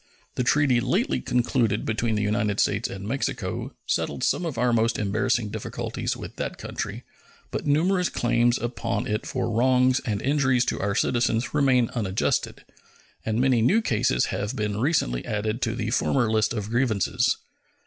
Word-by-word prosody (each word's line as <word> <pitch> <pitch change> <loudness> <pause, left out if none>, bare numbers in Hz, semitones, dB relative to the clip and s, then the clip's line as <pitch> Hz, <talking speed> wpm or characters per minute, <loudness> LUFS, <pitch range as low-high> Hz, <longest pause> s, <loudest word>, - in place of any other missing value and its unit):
The 125 - -1
treaty 130 -1 +3
lately 65 - 0
concluded 120 - 0
between 110 0 0
the 105 - 0
United 105 -1 0
States 105 +3 +1
and 95 +1 -7
Mexico 135 +5 -3
settled 70 -2 -1
some 175 - +1
of 145 -7 -5
our 120 0 +2
most 115 0 +2
embarrassing 110 +2 0
difficulties - - -4
with - - -9
that - - -4
country, - - -5 0.5
but - - -4
numerous 180 +5 +2
claims 120 +1 +2
upon 120 -2 -2
it 105 -2 -2
for - - -2
wrongs 125 +2 +3
and 105 -6 -2
injuries 130 -3 +2
to - - -2
our 100 0 -1
citizens 120 0 +1
remained 130 -5 +3
unadjusted, 100 -5 -1 0.6
and 110 +1 0
many 130 -2 +3
new 185 - +4
cases 110 - +1
have 100 +5 -3
been 105 -3 -2
recently 110 - +1
added 110 +3 -2
to 115 -1 0
the 110 +1 -2
former 120 -1 +1
list 110 -1 +2
of 105 -2 -4
grievances. 120 -5 +1
115 Hz, 160 wpm, -25 LUFS, 105-130 Hz, 0.6 s, new